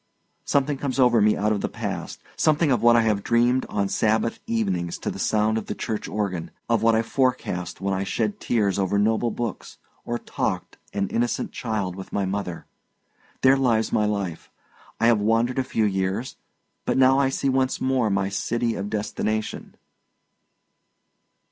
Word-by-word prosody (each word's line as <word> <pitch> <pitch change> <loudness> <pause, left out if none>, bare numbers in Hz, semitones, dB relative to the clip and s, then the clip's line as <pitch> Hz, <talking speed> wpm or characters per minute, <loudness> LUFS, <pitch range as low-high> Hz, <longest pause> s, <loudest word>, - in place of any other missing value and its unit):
Something 140 0 +1
comes 140 -2 -2
over 125 -4 +5
me 105 +1 +4
out 105 +1 +1
of 105 -2 0
the - - -1
past - - -5
something 155 -1 +2
of 125 - +2
what 120 0 +6
I 115 - +5
have 105 -2 +1
dreamed 120 +4 +2
on 100 -1 0
Sabbath 110 +3 +1
evenings 95 -7 -1
to - - -3
the - - -8
sound 110 +1 +1
of 110 - -9
the - - -3
church 110 -1 -3
organ, 95 -5 -3 0.2
of 115 -2 +2
what 115 0 +4
I 110 - +2
forecast 120 -9 -1
when 100 0 0
I 95 0 -1
shed 105 +2 -2
tears 100 -5 +1
over 95 +1 +1
noble 110 +3 +2
books, 115 -2 -5 0.3
or 120 - -2
talked, - - -3
an 100 -1 -1
innocent 120 +1 -1
child, 105 -6 -3
with 95 0 -9
my 100 - 0
mother. 95 -3 -4 0.8
There 130 +1 +6
lies 120 -5 +1
my 105 - +3
life; 100 -5 -3 0.5
I - - +2
have 115 -3 +4
wandered 115 +4 +2
a - - +2
few 110 -3 0
years, 95 +4 -1 0.5
but - - 0
now 130 +1 +5
I 135 -1 +3
see 135 - -1
once 130 0 +1
more 130 -4 +1
my 100 -1 +1
city 115 +4 -1
of 100 -1 -4
destination." 110 +1 -3
110 Hz, 175 wpm, -24 LUFS, 100-120 Hz, 0.8 s, what